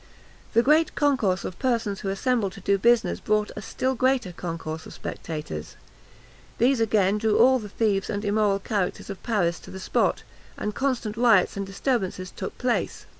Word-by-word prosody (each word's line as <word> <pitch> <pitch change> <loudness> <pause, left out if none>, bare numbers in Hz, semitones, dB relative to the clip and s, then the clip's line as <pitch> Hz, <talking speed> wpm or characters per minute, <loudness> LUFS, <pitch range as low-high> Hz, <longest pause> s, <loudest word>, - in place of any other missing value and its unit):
The 230 +1 +5
great 310 +4 +3
concourse 235 -11 +1
of 180 - -6
persons 230 -6 0
who 195 - -3
assembled 200 0 0
to - - -10
do 200 +1 +2
business 235 +2 +3
brought 210 -1 0
a 210 - -5
still 255 +4 -1
greater 255 -5 +1
concourse 165 -2 -5
of - - -10
spectators. 115 - -6 0.8
These 255 +2 +3
again 210 -2 +2
drew 220 -1 +2
all 260 +2 +6
the 210 -2 -8
thieves 200 -2 0
and 205 +1 -3
immoral 205 -1 +2
characters 200 -1 -2
of 195 - -8
Paris 180 -7 0
to - - -13
the 190 - -8
spot, 190 - 0 0.3
and 210 - -3
constant 245 -5 -1
riots 230 -6 +4
and 200 -1 -3
disturbances 195 -3 -2
took - - -6
place. 250 -1 -1
210 Hz, 175 wpm, -25 LUFS, 195-240 Hz, 0.8 s, all